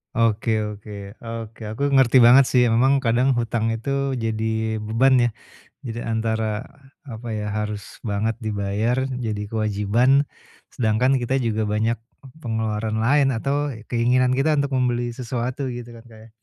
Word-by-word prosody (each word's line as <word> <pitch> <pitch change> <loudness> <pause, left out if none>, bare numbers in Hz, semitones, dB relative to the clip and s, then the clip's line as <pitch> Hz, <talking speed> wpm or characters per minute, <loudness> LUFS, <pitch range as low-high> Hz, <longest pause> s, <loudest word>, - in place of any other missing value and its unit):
Oke 110 -1 +1
oke 105 -1 -7
oke. 115 -1 -7
Aku 140 +4 0
ngerti 130 -2 +5
banget 125 +3 +8
sih. 125 - +3
Memang 130 +4 +3
kadang 125 +2 +2
hutang 115 -1 0
itu 140 +4 -2
jadi 110 -1 -1
beban 115 +5 +3
ya. 120 -1 +3 0.6
Jadi 120 0 -4
antara, 110 0 -2 0.4
apa 115 -1 -7
ya, 105 -1 -3
harus 105 -2 -5
banget 110 +1 -1
dibayar 110 +5 -1
jadi 115 -5 -3
kewajiban, 110 +6 +2 0.5
sedangkan 115 +3 +2
kita 130 +3 0
juga 110 -3 -1
banyak 110 +2 0 0.5
pengeluaran 110 -1 -2
lain 135 +4 +3
atau 140 +4 -1 0.2
keinginan 125 +2 +2
kita 135 +4 +2
untuk 140 -1 0
membeli 120 -2 0
sesuatu 125 +2 -3
gitu 120 -1 -8
kan, 115 - -12
Kak 110 - -14
ya. - - -17
115 Hz, 140 wpm, -22 LUFS, 110-130 Hz, 0.6 s, banget